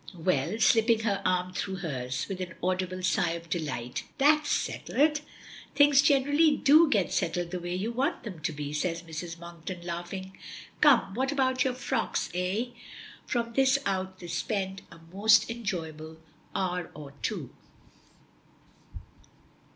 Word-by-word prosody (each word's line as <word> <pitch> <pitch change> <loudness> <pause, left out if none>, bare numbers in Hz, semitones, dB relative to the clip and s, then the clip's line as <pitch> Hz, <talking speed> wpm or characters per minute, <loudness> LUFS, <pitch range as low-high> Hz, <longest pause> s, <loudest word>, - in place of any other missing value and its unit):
"Well," 165 +3 0
slipping 225 0 +4
her 200 -3 0
arm 180 0 0
through 190 +1 -3
hers, 130 -8 -3
with 190 -2 -5
an 175 -2 -5
audible 185 0 -1
sigh 175 -2 +2
of 170 -1 -8
delight. 130 -8 -3
"That's 300 +2 +4
settled." 300 +1 +1 0.5
"Things 285 -1 +6
generally 290 +2 +4
do 310 +3 +6
get 200 -8 +1
settled 175 +1 -1
the 180 - -3
way 175 +1 -4
you 205 +5 -2
want 270 +7 -1
them 195 -8 -7
to 165 +2 -2
be," 145 -1 -5
says 165 +2 -2
Mrs. 165 +1 -6
Monkton, 170 +1 -8
laughing. 175 +2 -5 0.5
"Come, 280 -9 +5
what 265 +5 0
about 260 -2 +2
your 255 -2 -1
frocks, 260 - -2
eh?" 185 +7 -1 0.6
From 235 -1 -1
this 270 +2 +4
out 190 -1 -2
they 180 - -10
spend 190 +3 -2
a - - -12 0.2
most 220 +3 +5
enjoyable 160 -8 -5 0.4
hour 180 -2 -1
or 145 -2 -9
two. - - -3
185 Hz, 145 wpm, -28 LUFS, 170-240 Hz, 0.6 s, Things